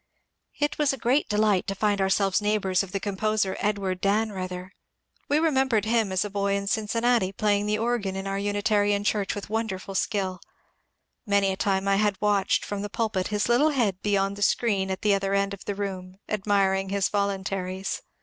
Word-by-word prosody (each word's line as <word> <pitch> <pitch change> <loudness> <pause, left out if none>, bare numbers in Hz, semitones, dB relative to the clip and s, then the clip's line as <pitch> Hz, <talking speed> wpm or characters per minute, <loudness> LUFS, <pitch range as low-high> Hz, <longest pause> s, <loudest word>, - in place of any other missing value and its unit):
It 295 0 -1
was 295 -2 +3
a 270 - -4
great 250 +5 +1
delight 210 -3 +2
to 195 - -2
find 205 0 +1
ourselves 195 +1 +2
neighbours 205 -3 +1
of 195 -2 -6
the 195 - -2
composer 205 0 -1
Edward 195 -3 -1
Dannreuther. 195 -3 -1 0.6
We 290 - +3
remembered 265 -9 +2
him 220 -3 +1
as 190 +2 +1
a - - -4
boj 200 0 0
in 200 0 -2
Cincinnati 220 0 +1
playing 205 +1 +1
the 210 0 +1
organ 225 -4 -1
in 195 0 -4
our 195 0 -2
Unitarian 205 0 +1
church 205 -1 0
with 205 0 -7
wonderful 210 -4 -3
skill. 190 -2 -1 0.9
Many 200 -1 +3
a - - -2
time 195 0 0
I 195 0 +3
had 205 -2 +1
watched 205 -2 +1
from 205 -1 -4
the 205 - -4
pulpit 210 -5 -1
his 210 0 -1
little 245 +6 +4
head 225 -10 0
beyond 200 -1 0
the - - -8
screen 200 -2 +1
at 190 - -4
the 210 -1 +4
other 195 0 0
end 200 0 +1
of 195 - -10
the 205 - -3
room, 190 -2 -5
admiring 195 -2 +1
his 200 -1 +1
voluntaries. 195 -2 -2
200 Hz, 190 wpm, -26 LUFS, 195-215 Hz, 0.9 s, little